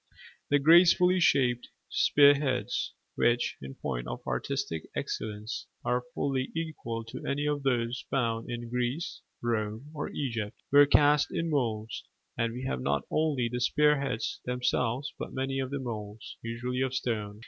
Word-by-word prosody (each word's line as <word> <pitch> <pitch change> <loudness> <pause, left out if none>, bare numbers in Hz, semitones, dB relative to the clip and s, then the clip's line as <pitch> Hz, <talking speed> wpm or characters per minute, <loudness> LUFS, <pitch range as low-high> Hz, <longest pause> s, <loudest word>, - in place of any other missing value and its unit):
The 145 - +5
gracefully 175 +4 +6
shaped 125 -7 +3 0.2
spear 145 0 +6
heads, 140 -3 -1 0.2
which, 120 0 +2
in 65 0 -8
point - - -4
of 60 - -4
artistic 80 - -3
excellence, 105 +1 -4 0.2
are 125 +1 +1
fully 135 -2 -1
equal 150 -9 -4
to 115 - -8
any 145 +1 -1
of 145 -1 0
those 125 -2 0
found 115 -4 -1
in 120 0 -4
Greece, 125 +6 -2 0.2
Rome, 115 +4 -2
or 150 - -4
Egypt, 115 -7 -3
were 145 0 +8
cast 145 0 +5
in 165 0 -1
moulds: 115 -6 -1 0.3
and 115 0 0
we 125 +3 -6
have 65 - -2
not 70 +1 0
only 150 -6 +1
the 125 +1 -3
spear 150 +2 +3
heads 125 -5 -2
themselves 125 +1 -1
but - - -6
many 135 0 -1
of 130 -1 -2
the 140 - -3
moulds, 110 -4 -6
usually 125 +2 -3
of 130 0 0
stone. 105 -4 -2
125 Hz, 155 wpm, -29 LUFS, 115-140 Hz, 0.3 s, were